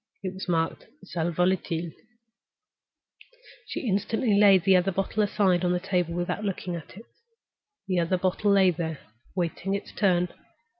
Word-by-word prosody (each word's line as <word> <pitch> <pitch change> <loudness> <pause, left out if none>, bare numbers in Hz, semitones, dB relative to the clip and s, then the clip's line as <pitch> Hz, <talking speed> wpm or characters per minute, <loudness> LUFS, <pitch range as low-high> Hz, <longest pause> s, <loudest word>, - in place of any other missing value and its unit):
It 185 -1 -3
was 190 -1 -7
marked—Sal 170 - -2
volatile. 175 -1 0 1.8
She - - -4
instantly 215 +3 +1
laid 200 -3 +6
the 195 0 +5
other 185 +2 +3
bottle 195 +3 -1
aside 195 -3 +2
on 180 0 +2
the 180 - 0
table 180 -3 -1
without 175 +4 -2
looking 185 -3 -3
at 170 +2 -10
it. 225 - -11 0.8
The 185 -2 +1
other 170 +2 +1
bottle 185 +3 0
lay 190 -2 +5
there, 160 -2 -4 0.4
waiting 180 +2 -1
its 200 - -6
turn. 180 -3 +2
185 Hz, 145 wpm, -26 LUFS, 175-195 Hz, 1.8 s, laid